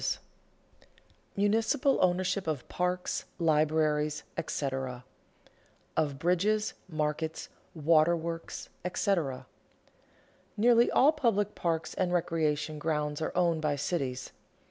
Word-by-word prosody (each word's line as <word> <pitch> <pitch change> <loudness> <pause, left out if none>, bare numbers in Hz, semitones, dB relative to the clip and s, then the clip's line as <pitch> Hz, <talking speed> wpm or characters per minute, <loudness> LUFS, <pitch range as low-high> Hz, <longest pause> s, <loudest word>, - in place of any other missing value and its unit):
[Sidenote: - - -2 1.1
Municipal 225 +7 +2
ownership 185 +1 +1
of 150 -5 -2
parks, 180 0 -2
libraries, 155 -1 +2
&c.] - - -2
[Sidenote: 130 -3 -3 0.9
Of 145 -3 0
bridges, 190 +7 +1 0.2
markets, 155 0 -2 0.3
waterworks, 165 +1 +1 0.3
&c.] 200 - +2 1.4
Nearly 235 +2 +5
all 285 +4 +5
public 220 -9 +1
parks 165 -2 -2
and 185 -2 0
recreation 155 -3 0
grounds 150 -1 -1
are 155 - -1
owned 170 -3 +2
by 150 -2 +1
cities. 135 -4 -2
165 Hz, 100 wpm, -30 LUFS, 150-185 Hz, 1.4 s, Nearly